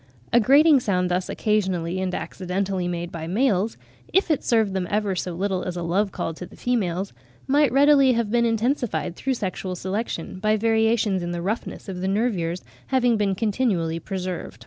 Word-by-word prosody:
A 240 - +7
grating 280 +5 +6
sound 180 -6 0
thus 180 +1 -1
occasionally 185 -4 0
and 185 -1 -2
accidentally 185 +2 -2
made 175 0 -4
by 160 -1 -6
the 175 - -4
males, 220 -3 +1 0.3
if 380 -3 +2
it 300 - +1
served 220 -4 +2
them 185 -2 -1
ever 205 -2 0
so 180 0 -3
little 190 +1 -1
as 180 -1 -4
a 175 - -3
love 195 +4 0
call 165 - -3
to 180 - -8
the - - -16
females, 195 - -1 0.3
might 285 -1 +3
readily 275 -1 +5
have 230 -3 -1
been 240 0 +3
intensified 230 -4 0
through 265 +6 -1
sexual 185 -3 -4
selection, 190 -1 -4
by 215 +2 +2
variations 220 -3 +2
in 175 0 -3
the 170 - -3
roughness 215 +4 -4
of 185 -2 -5
the 190 - -1
nervures 190 -5 -1 0.2
having 245 -3 +2
been 200 -3 +1
continually 195 -7 0
preserved. 180 - -5
195 Hz, 185 wpm, -24 LUFS, 180-230 Hz, 0.3 s, A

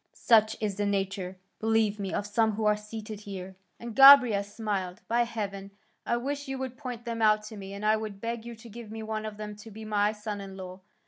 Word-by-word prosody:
Such 220 -2 +4
is 205 -3 -2
the 205 0 0
nature, 195 -2 -2 0.2
believe 220 -1 +2
me, 195 -2 -3
of 205 - -2
some 220 +1 +2
who 215 +1 -2
are 210 0 +4
seated 210 0 -7
here." 190 -2 -8 0.2
And 235 -2 -7
Gobryas 250 -8 +8
smiled. 200 -5 -3
"By 240 +1 +2
heaven, 200 -4 -5 0.4
I 235 - +2
wish 285 +3 -3
you 270 0 -3
would 260 -1 -5
point 250 -4 -7
them 230 -1 -3
out 215 -1 +4
to 220 - -9
me, 195 -1 -8
and 205 +1 -5
I 215 +1 +4
would 215 -2 -6
beg 230 +1 -4
you 235 0 -8
to 225 +1 -13
give 230 0 -10
me 220 0 -6
one 215 0 -3
of 210 -1 -8
them 210 -1 -6
to 210 +2 -11
be 220 +1 -9
my 210 -1 +2
son 210 -1 -5
in 195 -1 -9
law." 185 0 -8
215 Hz, 235 wpm, -28 LUFS, 200-230 Hz, 0.4 s, Gobryas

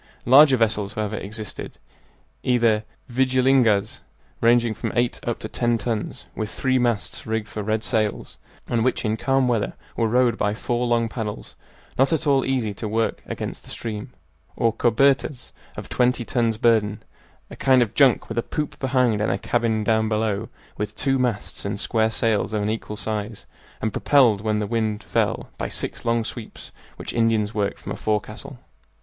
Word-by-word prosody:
Larger 135 +2 +7
vessels, 105 -3 0
however, 110 0 -2
existed, 105 +1 -7 0.6
either 115 -3 +2 0.2
"vigilingas," 130 -4 +2 0.4
ranging 120 -1 +4
from 110 - -4
eight 120 0 +1
up 120 - 0
to - - -6
ten 120 +1 0
tons, 110 0 -4
with 110 -1 -3
three 130 +2 +1
masts 120 -4 -1
rigged 110 -1 -3
with 105 -1 -4
red 110 0 0
sails, 110 -2 -1 0.3
and 115 -2 +1
which 130 -1 0
in 110 0 +1
calm 135 +2 +1
weather 115 -4 0 0.2
were 115 - +1
rowed 120 0 +2
by 105 0 +1
four 120 +1 -1
long 120 -1 +2
paddles 110 -3 -6 0.4
not 135 +3 +4
at 160 - 0
all 140 -2 +3
easy 125 -6 -1
to 110 +2 -5
work 110 +2 -1
against - - -5
the - - -12
stream; 110 +2 -5 0.5
or 115 -1 +2
"cobertas," 130 +3 +2 0.3
of - - -6
twenty 125 -1 +1
tons 115 -3 0
burden, 110 -3 +2 0.5
a - - -7
kind 130 -2 +4
of 115 -2 -6
junk 135 -4 +4
with 115 +1 -2
a - - +2
poop 150 +5 -4
behind 125 -5 +2
and 105 - +1
a 95 - 0
cabin 115 0 0
down 110 0 +2
below, 110 0 -1 0.3
with 105 0 -4
two 135 -1 +1
masts 120 -5 -2
and 100 0 -3
square 110 0 +1
sails 110 -1 0
of 105 -1 0
unequal 105 0 -3
size, 105 +1 -4 0.3
and 110 -1 -2
propelled, 120 -8 +4
when 110 0 0
the 105 - -1
wind 110 -1 -1
fell, - - -1
by - - -1
six - - -5
long 115 -1 +2
sweeps 110 0 -8 0.2
which - - -6
Indians 115 -2 +1
worked 100 -1 -1
from - - -8
a - - -2
forecastle. 110 +6 -3
115 Hz, 175 wpm, -23 LUFS, 105-125 Hz, 0.6 s, Larger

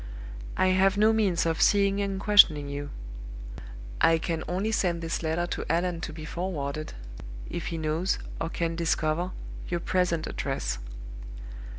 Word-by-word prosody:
"I 185 - +3
have 190 +1 +3
no 215 +2 +5
means 200 -7 +2
of 165 -1 0
seeing 200 -1 +4
and 195 -1 -2
questioning 180 -8 +6
you. 145 0 -5 1.1
I 165 - +5
can 160 0 -3
only 190 +6 -1
send 175 -5 +1
this 165 - -2
letter 165 +2 0
to 175 - -3
Allan 170 0 0
to 155 - -4
be 155 0 -8
forwarded, 155 -4 -4 0.6
if 170 - -4
he 165 - -3
knows, 160 +4 0 0.2
or 165 - -1
can 165 0 -2
discover, 165 +1 0 0.4
your 175 - -1
present 170 -2 0
address. 135 - -3
170 Hz, 150 wpm, -27 LUFS, 160-185 Hz, 1.1 s, questioning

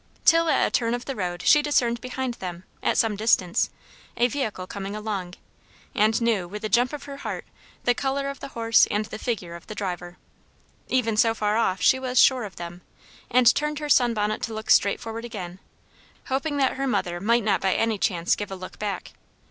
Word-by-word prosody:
Till 330 0 +5
at - - +3
a - - -2
turn 235 0 +1
of 245 - -7
the 270 - -4
road 175 -3 -3
she 295 - +6
discerned 240 -6 +1
behind 255 0 -3
them, 180 -1 -6 0.2
at - - +1
some 225 -2 +2
distance, 195 -4 +2 0.5
a 240 +1 +4
vehicle 225 -8 -3
coming 200 +1 -6
along, 200 -4 -4 0.6
and 215 +1 +3
knew, 225 -6 +1
with 210 +4 -8
a 215 - -2
jump 245 +4 +3
of 295 -1 -6
her 280 -1 -8
heart, - - -5 0.4
the 245 - +3
colour 275 +2 -1
of 275 0 -5
the - - -6
horse 230 -3 +3
and 210 +1 0
the 215 0 -8
figure 195 -9 -3
of 170 - -12
the 215 - -7
driver. 180 -3 -5 0.7
Even 230 -4 +1
so 225 0 +4
far 210 -1 0
off 195 -5 +1
she 260 - +5
was 255 -1 -3
sure 255 -4 +5
of 195 - -9
them, 175 +1 -8 0.5
and 250 0 +6
turned 300 0 -1
her 300 0 -4
sun 245 -4 +4
bonnet 210 0 -1
to 225 - -4
look 220 0 -3
straight 200 - +4
forward 225 0 -6
again, 190 -6 -7 0.7
hoping 285 +3 -1
that 270 -2 +1
her 275 0 -1
mother 175 -8 -1
might 230 +3 +2
not 200 -2 +1
by 190 -1 +1
any 225 -2 0
chance 175 -5 +1
give 205 - -5
a 195 - -5
look 185 0 -10
back. 205 -2 -4
225 Hz, 210 wpm, -25 LUFS, 195-250 Hz, 0.7 s, she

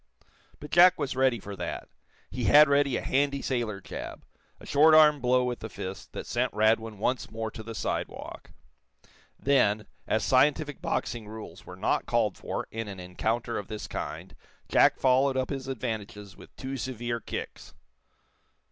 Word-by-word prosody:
But 150 - -10
Jack 180 +1 +7
was 140 -4 -3
ready 130 -3 +2
for 100 0 -8
that. 90 -2 -5 0.4
He 125 -2 -3
had 150 +1 +8
ready 140 -2 +2
a - - -5
handy 140 +1 +1
sailor 120 -6 -2
jab - - -8 0.3
a - - -13
short 155 +2 +5
arm 150 -2 +7
blow 125 +1 +3
with 125 -1 -2
the 110 - -7
fist 95 -1 -7
that - - -6
sent 125 +1 -1
Radwin 110 0 +2
once 125 +5 -1
more 110 0 -4
to 110 - -9
the 115 +1 -8
sidewalk. - - -4 0.9
Then, 110 -6 +2 0.2
as 110 - +1
scientific 145 +3 +2
boxing 115 -2 -2
rules 105 -5 -10
were 90 - -9
not 95 +4 0
called 115 -4 +1
for - - -5
in 115 -1 -4
an 100 -2 -7
encounter 110 +7 -2
of 100 - -8
this 110 -1 -6
kind, - - -6 0.3
Jack - - +4
followed 130 +1 +3
up 130 +2 -1
his 135 -2 -4
advantages 110 -5 -5
with - - -16
two 135 +1 -5
severe 120 -1 -3
kicks. - - -7
120 Hz, 165 wpm, -28 LUFS, 110-135 Hz, 0.9 s, had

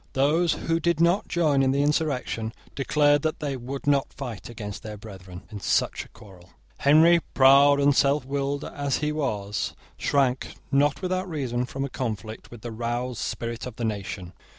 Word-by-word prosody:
Those 155 +5 +3
who 165 0 -1
did 170 0 +1
not 170 +4 +3
join 155 -6 +2
in 135 - +3
the 140 +2 +2
insurrection 140 -7 -1 0.2
declared 145 +1 +3
that 155 +1 -2
they 145 -2 -2
would 130 +3 -6
not 140 -1 +2
fight 120 -7 -7
against 105 -3 -7
their 105 -1 -7
brethren 95 -3 -11
in 105 - -6
such 95 - 0
a - - -19
quarrel. 95 -6 -16 0.3
Henry, 160 +4 +6 0.2
proud 140 +1 +7
and 140 0 +4
selfwilled 140 0 +1
as 140 -2 -2
he 150 0 -1
was, 105 -9 -2 0.2
shrank, 135 -3 0 0.2
not 145 +5 +2
without 185 0 -1
reason 125 -6 -2
from 135 +2 -3
a - - -2
conflict 110 -4 -5
with 120 -2 -11
the 120 - -6
roused 120 +2 -3
spirit 115 +1 -4
of 125 - -8
the 115 - -3
nation. 100 -4 -4
135 Hz, 175 wpm, -25 LUFS, 115-145 Hz, 0.3 s, proud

